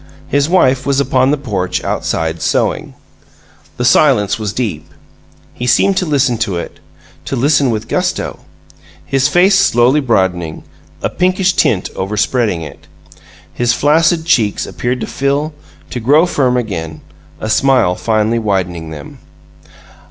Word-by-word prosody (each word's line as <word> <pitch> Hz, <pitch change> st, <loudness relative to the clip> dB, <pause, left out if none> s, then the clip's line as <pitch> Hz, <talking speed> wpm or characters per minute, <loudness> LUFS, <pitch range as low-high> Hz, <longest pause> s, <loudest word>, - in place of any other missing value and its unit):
His 145 Hz, +2 st, +1 dB
wife 135 Hz, -8 st, +3 dB
was 140 Hz, -1 st, +2 dB
upon 130 Hz, -1 st, +2 dB
the 150 Hz, -, +1 dB
porch, 100 Hz, -9 st, -3 dB
outside, 80 Hz, 0 st, -2 dB
sewing. -, -, -1 dB, 0.8 s
The 125 Hz, -, -1 dB
silence 125 Hz, -6 st, +3 dB
was 105 Hz, -2 st, -3 dB
deep. 95 Hz, -10 st, -4 dB, 0.6 s
He 125 Hz, -, -5 dB
seemed 195 Hz, +10 st, +3 dB
to 185 Hz, -, 0 dB
listen 135 Hz, -6 st, +1 dB
to 95 Hz, -3 st, -1 dB
it 85 Hz, -, -7 dB, 0.5 s
to -, -, -3 dB
listen 135 Hz, +1 st, +2 dB
with 110 Hz, -1 st, -3 dB
gusto; -, -, -2 dB, 0.7 s
his 135 Hz, 0 st, +1 dB
face 185 Hz, +6 st, +4 dB
slowly 120 Hz, +5 st, +3 dB
broadening, 95 Hz, -, -1 dB, 0.4 s
a -, -, 0 dB
pinkish 185 Hz, 0 st, +1 dB
tint 95 Hz, -, +1 dB
overspreading 105 Hz, -1 st, -1 dB
it. 75 Hz, -3 st, -11 dB, 0.7 s
His 120 Hz, 0 st, +1 dB
flaccid 160 Hz, +4 st, +2 dB
cheeks 115 Hz, -12 st, +1 dB
appeared 125 Hz, +1 st, -3 dB
to -, -, -2 dB
fill, 140 Hz, +3 st, -1 dB, 0.4 s
to 125 Hz, -, -3 dB
grow 145 Hz, +8 st, +4 dB
firm 130 Hz, -7 st, +1 dB
again, 85 Hz, -9 st, -4 dB, 0.4 s
a -, -, -4 dB
smile 125 Hz, -4 st, +3 dB
finally 110 Hz, +3 st, 0 dB
widening 90 Hz, -6 st, -2 dB
them. 75 Hz, -2 st, -10 dB
125 Hz, 135 wpm, -15 LUFS, 100-140 Hz, 0.8 s, face